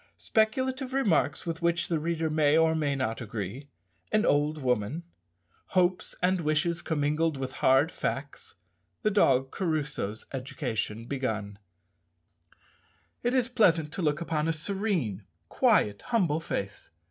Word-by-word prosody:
_Speculative 260 +4 0
remarks 195 - +1
with 165 0 -4
which 170 0 +1
the 165 -3 0
reader 165 +1 -1
may 155 0 +4
or 160 0 +4
may 150 -3 0
not 130 -3 -2
agree 110 +5 -5 0.4
An 215 0 +3
old 150 +2 +2
woman 125 +3 -1 0.7
Hopes 180 0 +2
and 185 0 +2
wishes 165 +2 +1
commingled 150 0 0
with 130 -1 -4
hard 135 +5 +4
facts - - -4 0.5
The 215 - +3
dog 135 -10 +3
Crusoe's 150 - -2
education 115 -4 -3
begun_. 110 -7 -3 1.6
It 245 +2 0
is 250 -2 +2
pleasant 170 -11 +3
to 190 - -3
look 150 0 0
upon 160 -2 -1
a 165 - +2
serene, 160 - -2 0.2
quiet, 105 -1 +2
humble 175 -10 +1
face. 100 -11 -5
155 Hz, 130 wpm, -28 LUFS, 130-175 Hz, 1.6 s, may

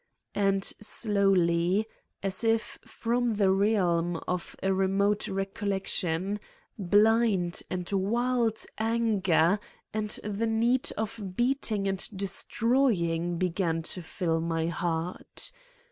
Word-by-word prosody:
And 195 -1 +1 0.2
slowly, 195 -3 +2 0.4
as 195 +2 -1
if 225 0 0
from 235 0 -1
the 200 -2 +3
realm 180 -4 +2
of 180 -1 -3
re 190 0 +2
mote 200 +2 +1
recollection, 195 -1 -1 0.4
blind 205 -2 +2
and 180 -1 -3
wild 230 +3 +1
anger 210 -5 +2 0.3
and 215 -1 -2
the 210 +2 -2
need 235 +3 +1
of 205 -3 -4
beating 240 -5 +1
and 195 -1 +1
destroying 190 -4 0
began 170 -2 0
to 180 - +1
fill 165 -1 -1
my 165 -1 -1
heart. 170 +1 -3
195 Hz, 100 wpm, -28 LUFS, 175-220 Hz, 0.4 s, the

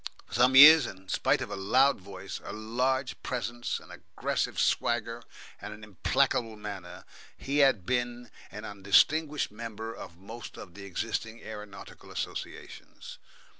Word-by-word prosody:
For - - -15
some 125 +4 +4
years, 150 0 +10
in 95 0 -11
spite - - +1
of - - -8
a - - -3
loud 125 +8 +3
voice, 95 0 -8
a - - -7
large 125 +5 -1
presence, 120 -1 -3
an - - -15
aggressive - - -3
swagger, 120 0 0 0.4
and 105 - -7
an 110 - -15
implacable 115 +3 0
manner, 100 -4 -8 0.3
he 140 +2 -1
had 135 -10 +4
been 120 0 -2 0.2
an 105 +2 -8
undistinguished 145 +10 +2
member 115 0 -7
of 85 - -10
most 110 +5 -10
of 85 - -10
the 100 0 -10
existing 110 +3 -4
aeronautical 105 -2 -10
associations. - - -7
115 Hz, 140 wpm, -29 LUFS, 100-125 Hz, 0.4 s, years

